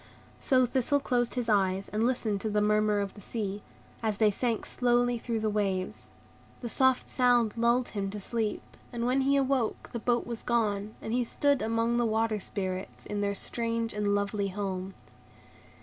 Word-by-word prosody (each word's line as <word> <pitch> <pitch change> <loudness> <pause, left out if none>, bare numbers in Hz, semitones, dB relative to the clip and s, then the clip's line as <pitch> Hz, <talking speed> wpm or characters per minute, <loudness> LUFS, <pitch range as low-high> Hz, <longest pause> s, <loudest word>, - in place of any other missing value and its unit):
So 255 -1 +4
Thistle 260 +3 +1
closed 245 -3 0
his 245 -2 -1
eyes, 195 -2 +2
and 220 +3 +1
listened 220 -5 -1
to 220 - -1
the 210 0 +1
murmur 210 0 +2
of 200 -1 -4
the 205 - -13
sea, 205 -1 -4 0.4
as 215 -3 0
they 215 -1 +4
sank 230 +1 -1
slowly 245 -1 +1
through 230 -1 -2
the 220 - 0
waves. 195 -3 -2 0.5
The 240 - -4
soft 260 +1 +2
sound 245 -4 +3
lulled 235 +2 +2
him 200 -2 -3
to 205 +1 -5
sleep, 220 +1 -2 0.3
and 235 -1 -2
when 255 +2 +2
he 275 +1 +3
awoke 265 -4 0
the 235 - -2
boat 240 +1 +1
was 235 -2 -5
gone, 215 -3 0
and 220 - -3
he 245 0 +2
stood 285 +3 +1
among 230 +1 +1
the 240 - +2
Water 220 0 +1
Spirits, 190 -1 -5
in 205 0 -3
their 200 0 0
strange 230 +2 -2
and 205 -1 +1
lovely 200 0 0
home. 190 -1 -4
225 Hz, 180 wpm, -29 LUFS, 205-240 Hz, 0.5 s, So